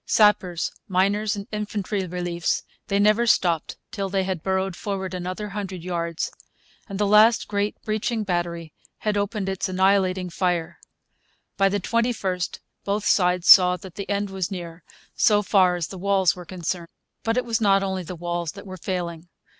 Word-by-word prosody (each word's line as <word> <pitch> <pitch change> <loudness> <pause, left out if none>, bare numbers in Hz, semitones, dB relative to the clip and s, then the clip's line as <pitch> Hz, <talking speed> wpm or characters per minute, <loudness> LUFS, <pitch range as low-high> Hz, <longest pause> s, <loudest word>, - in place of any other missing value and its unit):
Sappers, 190 -5 +3 0.2
miners, 200 +3 +1
and 200 -1 -6
infantry 205 -2 -3
reliefs, 175 -1 -2 0.2
they 200 - +1
never 215 +3 +3
stopped 170 -7 +2
till 200 -3 -3
they 195 0 0
had 185 -3 -3
burrowed 190 0 -1
forward 190 -1 -4
another 185 +3 -4
hundred 195 -4 -5
yards, 170 -2 -2 0.6
and 195 - -4
the 205 - +1
last 215 +3 +5
great 205 0 -1
breaching 220 +1 -1
battery 170 -4 -3 0.2
had 210 -1 -1
opened 205 0 -1
its 190 0 -2
annihilating 185 -1 +2
fire. 175 -2 -1 0.8
By 195 0 +3
the 205 +1 0
21st 200 -4 -1 0.3
both 205 +1 -1
sides 180 -2 +2
saw 180 -1 +8
that 190 -2 -11
the 200 - -7
end 200 -1 -1
was 190 -1 -2
near, 170 -3 -7 0.3
so 210 -1 +3
far 185 -2 +4
as 175 -3 -3
the 190 - -8
walls 195 -1 +2
were 180 -1 -9
concerned. 175 -1 -4 0.3
But 225 +1 0
it 250 - +1
was 230 -1 -1
not 195 -2 +4
only 190 -1 -2
the 180 +1 -7
walls 175 -1 -3
that 200 - -11
were 185 -1 -8
failing. 175 -2 -4
190 Hz, 170 wpm, -24 LUFS, 180-205 Hz, 0.8 s, saw